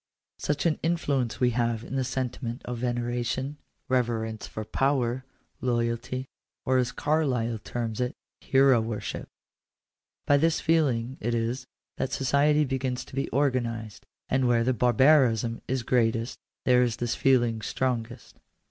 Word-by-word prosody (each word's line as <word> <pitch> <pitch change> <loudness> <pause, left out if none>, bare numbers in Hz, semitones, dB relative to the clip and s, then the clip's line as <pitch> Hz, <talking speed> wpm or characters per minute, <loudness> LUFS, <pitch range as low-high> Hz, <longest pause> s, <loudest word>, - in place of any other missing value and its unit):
Such 145 +1 -1
an 165 -2 +2
influence 145 -8 0
we 125 -1 +3
have 115 -1 0
in 125 - -6
the 135 - +1
sentiment 125 -1 -3
of 120 -1 -4
veneration, 120 +3 -2 0.3
reverence 115 -3 -1
for 110 - -6
power, 130 0 0 0.4
loyalty, 120 +1 -1 0.4
or, 130 0 +3
as 125 -1 0
Carlyle 125 -7 0
terms 115 +1 -4
it 125 +1 -1 0.2
— - - -63
hero 135 -3 +6
worship. 110 -1 -4 1.0
By 145 - +5
this 165 +2 +2
feeling 135 -7 +1
it 120 +2 0
is, 120 +3 -2 0.3
that 130 - -2
society 145 +3 +3
begins 130 -1 -2
to - - -12
be 135 - -1
organized; 120 -5 -1 0.2
and 130 -1 +2
where 120 -1 +3
the 130 +2 +2
bar 125 +1 +2
barism 120 -4 +4
is 130 -1 -1
greatest, 115 -1 +1 0.3
there 125 -1 +5
is 120 -3 +1
this 120 0 -1
feeling 120 -4 +2
strongest. 120 +1 -3
125 Hz, 145 wpm, -27 LUFS, 115-135 Hz, 1.0 s, hero